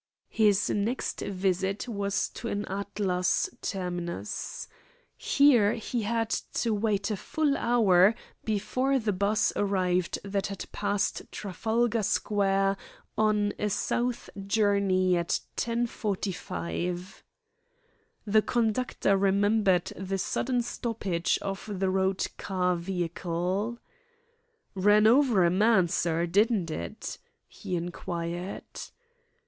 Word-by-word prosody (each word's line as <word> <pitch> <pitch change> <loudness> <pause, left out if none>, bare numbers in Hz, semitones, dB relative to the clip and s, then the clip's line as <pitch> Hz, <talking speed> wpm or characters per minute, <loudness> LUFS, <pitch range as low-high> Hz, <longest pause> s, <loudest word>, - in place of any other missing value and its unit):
His 205 -2 +3
next 215 +5 -1
visit 190 +2 -1
was 200 -3 -1
to 235 - -7
an 205 -1 -2
Atlas 195 -2 -1
terminus. 175 - -4 0.5
Here 245 -8 +4
he 235 +1 -3
had 225 +1 -1 0.2
to 230 -2 0
wait 205 -1 0
a - - 0
full 290 +7 0
hour 210 -5 +4 0.3
before 255 +6 0
the 220 -5 0
'bus 200 +3 +1
arrived 185 -3 +1
that 200 0 -2
had 195 -1 -6
passed 205 -1 -1
Trafalgar 220 +4 0
Square 195 -1 +1 0.4
on 210 -1 +2
a 210 - 0
south 240 +4 -1 0.2
journey 200 -3 +2
at 170 -1 0 0.2
10.45. 195 -5 -3 1.0
The 215 +1 +4
conductor 230 -3 +1
remembered 200 -1 +2
the 190 +1 -3
sudden 245 +5 0
stoppage 200 -8 -1
of 195 +2 -5
the 190 -1 0
Road 190 0 +1
Car 180 -2 0
vehicle. 180 +4 -2 1.0
"Ran 205 +2 +4
over 235 -4 +5
a 170 - +3
man, 195 -1 +4
sir, 170 0 0
didn't 195 -1 +2
it?" 85 - -5 0.3
he 180 - -5
inquired. 175 +1 -4
200 Hz, 105 wpm, -28 LUFS, 185-220 Hz, 1.0 s, over